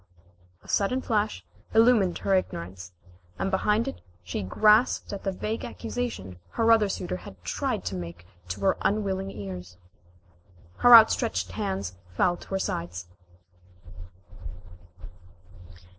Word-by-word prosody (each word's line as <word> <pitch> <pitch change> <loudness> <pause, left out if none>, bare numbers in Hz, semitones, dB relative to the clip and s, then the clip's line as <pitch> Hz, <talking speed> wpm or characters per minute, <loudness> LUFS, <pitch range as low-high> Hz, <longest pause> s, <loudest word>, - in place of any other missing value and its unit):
A - - -18
sudden 250 +6 0
flash 215 -2 -1 0.3
illumined 225 -6 +4
her 195 - 0
ignorance, 95 - -2 0.5
and 195 - -1
behind 210 +4 +1
it 90 - -6 0.2
she 90 +4 -4
grasped 210 - +3
at 200 - -6
the 195 - -1
vague 215 +4 -4
accusation 225 - -5
her 230 0 +3
other 220 -3 +5
suitor 90 - -3
had 90 +1 -12
tried 90 - -2
to 90 - -3
make 85 -1 -7 0.2
to 95 +3 -5
her 100 - +2
unwilling 195 -2 0
ears. 90 - -8 1.0
Her 245 -1 +9
outstretched 225 +1 +4
hands 190 - -3 0.2
fell 175 - +3
to - - -14
her 195 - -2
sides. 90 - -4
190 Hz, 125 wpm, -27 LUFS, -, 1.0 s, Her